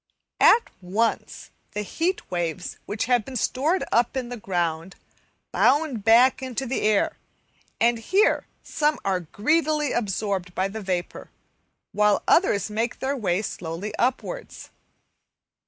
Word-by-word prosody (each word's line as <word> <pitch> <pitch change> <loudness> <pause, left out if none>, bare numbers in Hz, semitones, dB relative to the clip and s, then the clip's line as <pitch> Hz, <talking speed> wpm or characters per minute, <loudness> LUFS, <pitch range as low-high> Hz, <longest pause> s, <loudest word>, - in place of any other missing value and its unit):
At 465 +1 +5
once 205 +6 -2 0.2
the 210 0 -2
heat 340 - -2
waves 175 0 -3
which 205 +1 -2
have 245 -3 +2
been 265 +4 -9
stored 290 - 0
up 240 +2 +2
in 250 -2 -3
the 245 - -5
ground, 175 -4 -2 0.6
bound 275 -5 +2
back 235 +5 +5
into 260 0 -3
the 260 +1 -2
air, 210 -1 +1 0.6
and 235 0 +3
here 385 - +2 0.2
some 300 0 0
are 190 -2 +1
greedily 300 - 0
absorbed 195 -4 -2
by 190 +1 0
the 220 +2 -6
vapour, 185 -3 -4 0.6
while 210 -1 +2
others 320 - +3
make 225 +3 -2
their 270 +2 -2
way 200 -5 0
slowly 180 +2 -5
upwards. 265 - -3
225 Hz, 130 wpm, -24 LUFS, 195-265 Hz, 0.6 s, At